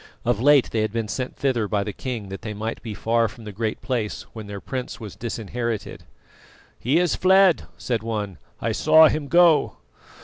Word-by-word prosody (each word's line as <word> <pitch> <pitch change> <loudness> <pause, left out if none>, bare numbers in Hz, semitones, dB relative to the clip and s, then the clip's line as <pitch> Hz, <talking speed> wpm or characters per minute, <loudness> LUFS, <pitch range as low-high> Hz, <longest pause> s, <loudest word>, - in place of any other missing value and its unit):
Of 120 -2 +1
late 145 0 +5
they 110 - 0
had 110 -1 -1
been 115 -1 -2
sent 130 +4 -4
thither 125 -6 0
by 100 -1 0
the 105 - -5
king 115 -5 -5
that 95 - -7
they 105 -1 -5
might 110 +2 -4
be 110 -3 -6
far 115 +2 +1
from 115 +2 -12
the 105 - -7
Great 110 +2 -3
Place 120 -6 -2
when 110 -3 -8
their 100 -1 -6
prince 130 +5 -5
was 105 -5 -8
disinherited. 115 -1 -4 0.7
"He 135 +7 +1
is 175 -1 +2
fled," 190 -1 +4
said 120 -4 -2
one; 105 -4 -4 0.2
"I - - -1
saw 160 0 +6
him 150 -1 -2
go." 170 -1 +4
115 Hz, 195 wpm, -23 LUFS, 105-130 Hz, 0.7 s, saw